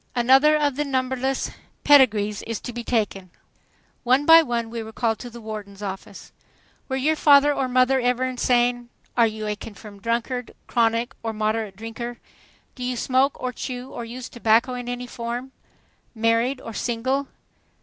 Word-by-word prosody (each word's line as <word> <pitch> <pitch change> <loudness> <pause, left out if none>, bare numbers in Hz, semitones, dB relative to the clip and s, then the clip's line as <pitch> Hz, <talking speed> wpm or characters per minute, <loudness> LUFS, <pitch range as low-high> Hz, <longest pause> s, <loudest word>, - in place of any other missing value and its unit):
Another 265 +5 +5
of 290 -3 0
the 295 - +1
numberless 260 -1 -1 0.3
"pedigrees" 215 -8 +4
is 230 -1 -3
to 245 - -6
be 240 0 -5
taken. 205 -6 -1 0.7
One 255 +4 +3
by 330 +1 +9
one 235 -5 -2
we 230 -1 -4
were 220 0 -8
called 225 -1 -1
to 245 - -7
the 235 0 -11
warden's 210 -2 -8
office. 195 -1 -7 0.6
"Were 265 - -1
your 295 +4 +1
father 290 -1 +6
or 270 -2 -1
mother 255 +1 +3
ever 250 0 +1
insane?" 245 -1 +1 0.3
"Are 235 -2 +5
you 215 0 -5
a 210 0 -1
confirmed 205 -1 -11
drunkard, 235 +2 -2
chronic 230 +2 +1
or 225 -1 -3
moderate 215 -1 -1
drinker?" 225 +3 -6 0.6
"Do 250 - -8
you 250 0 -2
smoke 260 +3 +1
or 255 0 -3
chew 250 +1 -6
or 240 - -6
use 245 +2 -7
tobacco 235 +2 +2
in 245 -1 -5
any 245 0 -4
form?" 245 +2 -5 0.6
"Married 230 +4 +1
or 230 - -8
single?" 260 +5 -1
240 Hz, 165 wpm, -23 LUFS, 225-260 Hz, 0.7 s, by